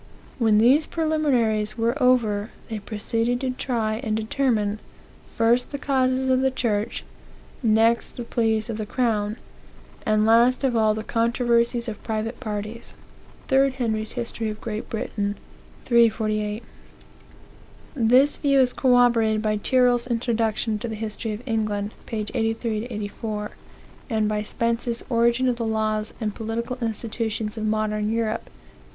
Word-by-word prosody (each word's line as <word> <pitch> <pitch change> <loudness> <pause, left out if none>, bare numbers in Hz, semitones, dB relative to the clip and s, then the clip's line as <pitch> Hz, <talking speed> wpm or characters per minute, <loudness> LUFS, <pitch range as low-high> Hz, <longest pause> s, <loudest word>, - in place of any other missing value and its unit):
When 220 -3 +4
these 260 +8 +5
preliminaries 250 -10 +1
were 230 +1 +1
over, 225 -4 +2 0.2
they 220 - -2
proceede 225 +3 -1
to 260 -1 0
try 230 -4 -1
and 220 -4 -1
determine, 220 -2 0 0.5
first 235 +2 +1
the 285 - -3
causes 260 -1 +1
of 260 0 +3
the 265 - +3
church, 225 -5 -1 0.6
next 225 0 +3
the 240 - -3
pleas 225 -2 0
of 225 -3 -4
the 215 - -3
crown, 215 -3 0 0.7
and 215 0 +2
last 235 +4 +4
of 260 -3 +1
all 215 -1 +3
the 215 - -4
controversies 235 +1 +1
of 215 -2 -6
private 225 +2 -3
parties." 215 0 -6 0.6
8 270 0 +4
Henry's 220 -4 -2
History 230 -2 -3
of 210 0 -6
Great 215 -1 -5
Britain, 205 -2 -2 0.5
348. 220 -2 +2 1.3
This 255 +3 +4
view 275 -2 +3
is 255 -1 +3
corroborated 235 -4 +3
by 215 -1 +1
Tyrrell's 245 +2 +2
Introduction 225 -2 0
to 235 - -4
the 220 - -4
History 220 +1 -4
of 210 +4 -7
England; 215 -3 -1
p. 215 -2 -3
83 225 -2 -1
84, 210 -1 -5 0.6
and 220 -3 +1
by 210 0 0
Spence's 230 +2 -2
Origin 235 +2 +3
of 245 -2 +1
the 235 - -2
Laws 215 -1 -1
and 215 -3 -2
Political 235 +4 -4
Institutions 220 -1 -3
of 215 -1 -2
Modern 215 0 0
Europe, 225 0 -1
p. - - -19
225 Hz, 140 wpm, -24 LUFS, 215-245 Hz, 1.3 s, these